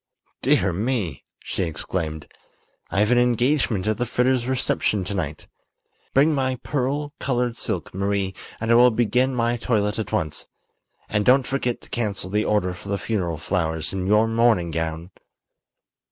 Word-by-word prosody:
"Dear - - +3
me!" 100 - -2 0.2
she - - -3
exclaimed; 80 -2 -3 0.6
"I've 105 +4 +2
an 125 - +5
engagement 120 -3 +2
at 110 0 0
the 125 - +1
Fritters' 125 +1 +1
reception 125 -6 0
to 100 +3 -4
night. 80 -6 -3 0.7
Bring 145 +4 +5
my 130 -2 0
pearl 145 +2 -1
colored 125 -3 0
silk, 95 -9 -4
Marie, 100 0 -1 0.3
and 110 +1 -1
I - - +7
will 120 +1 +7
begin 125 +3 +1
my 120 0 +1
toilet 105 -3 0
at 105 -3 -4
once. 80 -2 -2 0.6
And 105 -1 0
don't 130 +3 +5
forget 125 -3 -2
to - - -17
cancel 100 -5 -3
the 105 +1 +1
order 95 -4 +1
for 90 +2 -10
the 100 - 0
funeral 95 -6 -2
flowers 80 +1 -2
and 95 -1 -2
your 105 +2 +4
mourning 115 -7 +2
gown." 80 +2 -3
110 Hz, 155 wpm, -23 LUFS, 90-125 Hz, 0.7 s, I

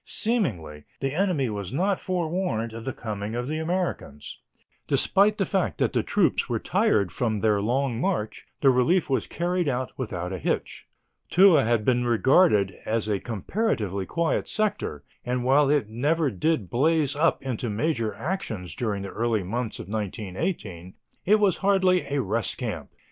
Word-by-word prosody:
Seemingly, 95 - -2
the 135 0 -2
enemy 175 -6 +1
was 100 -3 -5
not 190 +7 0
forewarned 170 -10 -2
of 115 0 -8
the 130 - -1
coming 105 -2 -5
of 120 +1 -3
the 155 +2 -2
Americans. 160 - -3 0.5
Despite 205 +2 +3
the 195 - +1
fact 190 0 -1
that - - 0
the - - +2
troops - - +1
were - - 0
tired 100 -4 +1
from 110 -4 -1
their 105 -2 +2
long 125 +2 0
march, 175 - -2
the 135 - +6
relief 135 +6 +2
was 130 - 0
carried 175 0 -1
out 130 0 -2
without 90 -8 -4
a 95 - -4
hitch. - - -3 0.4
Toul 185 -4 +6
had 115 -4 +1
been 125 -1 +2
regarded 120 - +3
as 110 -1 -1
a 105 -2 0
comparatively 105 - -2
quiet 170 -1 0
sector, 210 - -2 0.2
and, 125 0 -2
while 135 +2 +4
it 145 -7 +2
never 145 +6 0
did 105 - -1
blaze 150 +2 +2
up 160 0 +1
into 125 -3 -3
major 115 0 -1
actions 110 - -4
during 105 -5 -2
the 100 - -5
early 115 -2 -1
months 115 +4 -3
of - - -8
1918, 100 - -4 0.3
it 215 +2 +5
was 200 -4 +3
hardly 190 -2 +2
a 145 - +1
rest 105 0 -2
camp. - - -4
125 Hz, 165 wpm, -25 LUFS, 105-170 Hz, 0.5 s, the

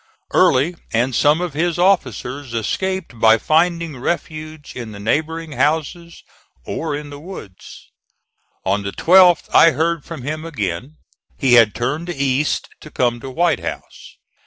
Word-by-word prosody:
Early 140 +7 +3 0.2
and 120 +3 +1
some 150 +7 +3
of 175 -4 -3
his 170 +3 -1
officers 140 - 0
escaped 185 - -3
by 110 0 +6
finding 165 +1 0
refuge 155 0 -4
in 115 -4 -7
the 100 - -9
neighboring 160 +9 -2
houses 160 +3 -2 0.4
or 155 -3 -3
in 145 0 -7
the 145 - -9
woods. 150 - -11 0.8
On 100 +2 +1
the 100 0 -5
12th 180 0 +5
I 165 - +7
heard 160 +2 0
from 160 -7 -8
him 155 +3 -4
again. 125 - -4 0.4
He 130 -3 +2
had 115 -3 +6
turned 150 +8 -3
east, 140 -2 0
to 155 - -12
come 120 -4 0
to 135 - -8
White 170 +6 +1
House. - - -8
150 Hz, 145 wpm, -19 LUFS, 125-165 Hz, 0.8 s, I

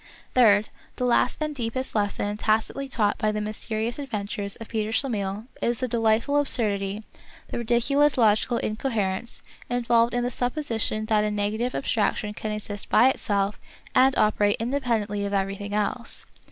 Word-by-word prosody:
Third, 215 -4 +5 0.3
the 250 - -1
last 245 0 +2
and 305 0 -2
deepest 255 0 -2
lesson 205 -1 -1
tacitly 220 +6 0
taught 215 -5 0
by 215 - +1
the 210 - -2
mysterious 220 +3 -3
adventures 205 -6 -3
of 225 - -9
Peter 215 -2 -2
Schlemihl 215 -4 -1 0.2
is 235 0 +1
the 255 - -2
delightful 230 +4 +2
absurdity, 210 -7 0 0.5
the - - -3
ridiculous 255 +5 +2
logical 225 +1 +3
incoherence, 215 -2 -2 0.3
involved 235 -1 +2
in 245 - +1
the 245 - -1
supposition 240 -4 -1
that 215 -1 +2
a 210 - +1
negative 210 +4 -1
abstraction 210 -3 0
can 215 0 -4
exist 210 -1 -5
by 245 +4 +6
itself 200 -4 -1 0.3
and 260 +1 +5
operate 205 -1 +3
independently 225 -5 -1
of 200 0 -3
every 195 0 0
thing 205 +1 -5
else. 210 +3 0
220 Hz, 155 wpm, -25 LUFS, 205-245 Hz, 0.5 s, by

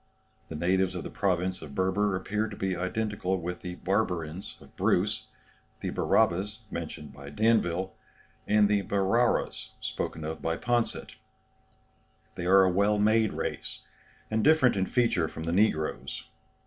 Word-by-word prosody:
The 80 - -6
natives 90 +3 +1
of 90 - -4
the - - -7
province 95 -1 0
of 75 -3 -9
Berber 95 +3 +1
appear 105 +3 -1
to 105 - -8
be 95 -1 -1
identical 95 0 -1
with 90 +1 -5
the 90 -1 -5
Barbarins 90 -3 -2
of - - -18
Bruce, - - +1 0.5
the - - -2
Barabas 105 +5 +1
mentioned 75 -4 -6
by 70 +1 -10
D'Anville, 95 -1 +1 0.6
and 105 0 +5
the 105 -1 +2
Barauras 100 +5 +1
spoken 80 - -3
of 80 +1 -5
by 80 0 -1
Poncet. 120 +2 -1 1.2
They 85 - -4
are 95 +1 +7
a 95 - +3
well 100 +3 +3
made 110 +1 +3
race, - - -4 0.5
and 110 0 +1
different 150 -7 +5
in 95 -1 0
feature 115 -10 +2
from 80 - -7
the 85 +1 -1
negroes. 90 -6 0
95 Hz, 150 wpm, -28 LUFS, 85-105 Hz, 1.2 s, are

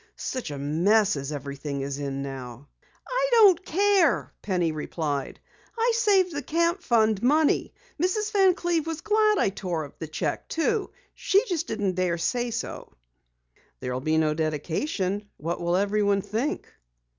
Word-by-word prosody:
"Such 255 -9 -4
a 145 - -5
mess 180 +9 +2
as 140 +1 -4
everything 140 -1 -5
is 140 +1 -4
in 140 -1 -3
now!" 130 -1 -8 0.4
"I - - 0
don't 400 -7 +6
care," 350 - +2
Penny 180 -4 0
replied. 150 -2 -3 0.4
"I 465 +1 +2
saved 400 -6 +3
the 290 - -2
Camp 335 +5 0
Fund 220 - +2
money. 295 +4 +2 0.3
Mrs. 420 +4 0
Van 385 -4 +4
Cleve 340 -4 -1
was 325 -1 -4
glad 430 0 +3
I - - +2
tore 180 -5 -3
up 140 - -16
the 160 - -5
cheque 155 -1 -3
too! 400 +5 0 0.2
She 400 +5 +2
just 345 -6 -2
didn't 205 -4 -1
dare 180 -1 0
say 240 +8 -1
so." 230 - -5 0.9
"There 125 - -4
will 130 - -3
be 155 +3 +1
no 155 -1 +2
dedication. 180 - -2
What 170 +4 -4
will 175 0 +1
everyone 200 0 +1
think?" 225 +8 -2
205 Hz, 155 wpm, -26 LUFS, -, 0.9 s, don't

